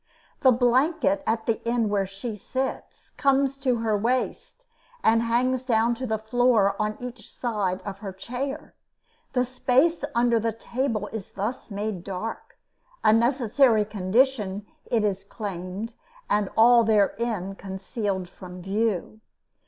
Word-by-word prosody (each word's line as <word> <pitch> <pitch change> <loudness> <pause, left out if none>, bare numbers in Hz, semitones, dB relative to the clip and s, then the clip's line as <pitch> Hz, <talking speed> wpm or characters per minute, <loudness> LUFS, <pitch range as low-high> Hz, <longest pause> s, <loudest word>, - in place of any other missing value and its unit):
The 265 - +5
blanket, 245 - +2
at 225 0 0
the 225 -2 0
end 235 -2 +1
where 200 -2 +1
she 195 +4 -6
sits, 260 +6 -5
comes 275 0 +3
to 260 -2 +2
her 225 -2 0
waist 250 - -2 0.4
and 225 +1 +4
hangs 245 +2 +1
down 235 -2 +2
to 255 +2 -4
the 220 -1 0
floor 220 -2 +3
on 215 0 -1
each 245 -2 -8
side 205 -6 -2
of 195 -1 -6
her 200 -2 -5
chair. 250 +9 -5 0.6
The 250 -1 +2
space 260 +6 +2
under 235 -1 +3
the 225 0 -1
table 230 -1 -2
is 220 -4 -6
thus 220 +7 -4
made 205 -3 -3
dark 200 +4 -6 0.5
a 215 - +6
necessary 235 -1 +3
condition, 210 0 +1 0.2
it 225 -3 +1
is 195 -2 0
claimed 200 +1 -5 0.3
and 205 -2 +1
all 235 +1 +7
therein 210 -2 +1
concealed 190 0 -4
from 180 0 -11
view. 210 +2 -1
225 Hz, 135 wpm, -25 LUFS, 200-245 Hz, 0.6 s, all